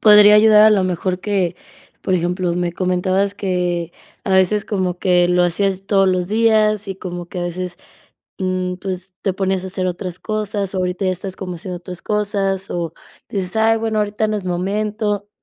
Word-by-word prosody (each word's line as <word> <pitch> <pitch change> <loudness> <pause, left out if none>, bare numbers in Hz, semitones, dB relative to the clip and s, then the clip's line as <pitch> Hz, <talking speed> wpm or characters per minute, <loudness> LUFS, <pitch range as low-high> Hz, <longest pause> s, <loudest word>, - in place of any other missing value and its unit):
podría 210 -1 +8
ayudar 210 0 +7
a 220 - +7
lo 195 -3 +3
mejor 180 +1 -1
que, 190 -4 -1 0.5
por 185 - -1
ejemplo, 175 0 0
me 175 -1 -1
comentabas 185 +2 0
que 180 -3 -2 0.3
a 195 - -3
veces 190 +2 +3
como 185 -4 -2
que 180 -2 +3
lo 180 0 +3
hacías 195 +2 0
todos 195 -2 +3
los 180 -1 0
días 215 -1 +3
y 195 - -4
como 175 -2 -6
que 180 - -7
a 175 - -2
veces, 175 0 -4 0.6
mm, 185 -1 -1
pues, 185 0 -6
te 195 - +1
ponías 190 -1 -1
a 190 - -4
hacer 185 0 -2
otras 180 0 -4
cosas, 210 -2 -2
ahorita 185 +1 -1
ya - - +2
estás 185 +1 -6
como 180 -2 -5
haciendo 180 +1 -6
otras 180 0 -9
cosas 200 -2 -1
o 170 -2 -3 0.4
dices: 195 +1 -2
"Ay 225 0 +3
bueno 220 -1 -1
ahorita 210 +1 0
no 215 - 0
es 195 - -5
momento", 205 +3 -2
190 Hz, 185 wpm, -19 LUFS, 180-205 Hz, 0.6 s, podría